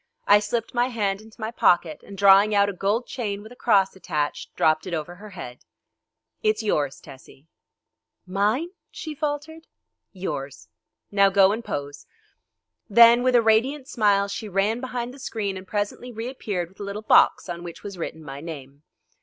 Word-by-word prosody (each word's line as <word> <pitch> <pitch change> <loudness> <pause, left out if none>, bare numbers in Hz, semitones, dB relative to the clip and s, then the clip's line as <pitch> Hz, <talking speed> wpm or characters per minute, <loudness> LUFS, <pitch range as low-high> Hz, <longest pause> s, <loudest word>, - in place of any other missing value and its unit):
I 205 +1 +6
slipped 225 +2 -3
my 240 0 +2
hand 205 -5 -2
into 220 +1 -17
my 220 0 -3
pocket, 175 -7 +2
and 200 - -12
drawing 200 +2 +6
out 200 0 +4
a - - -4
gold 205 +6 0
chain 205 -5 -4
with 220 - -12
a - - -12
cross 200 -6 +2
attached, 150 -6 -3
dropped 155 +2 +2
it 175 - -2
over 160 +2 -5
her 210 +3 -11
head. 150 -10 -9 0.8
"It's 215 +1 +1
yours, 145 -9 0
Tessie." 135 +1 -15 0.8
"Mine?" 210 - 0 0.2
she 315 - -7
faltered. 305 +2 -4 0.4
"Yours. 140 -8 -6 0.4
Now 200 -1 +5
go 195 0 +5
and 225 +3 -3
pose," 145 -4 -6 0.8
Then 235 +3 +7
with 255 0 +2
a 235 - +5
radiant 255 +6 +2
smile 205 -5 +2
she 205 +2 -5
ran 205 +5 0
behind 250 -1 -4
the 275 - -13
screen 210 -6 -3
and 185 0 -9
presently 205 +5 -3
reappeared 220 -6 -4
with 190 - -25
a - - -5
little 200 +2 -5
box 220 - +4
on 175 -1 -5
which 170 -1 -9
was 200 -1 -7
written 160 -1 -5
my 135 -1 -8
name. 145 -4 -9
205 Hz, 175 wpm, -24 LUFS, 180-230 Hz, 0.8 s, Then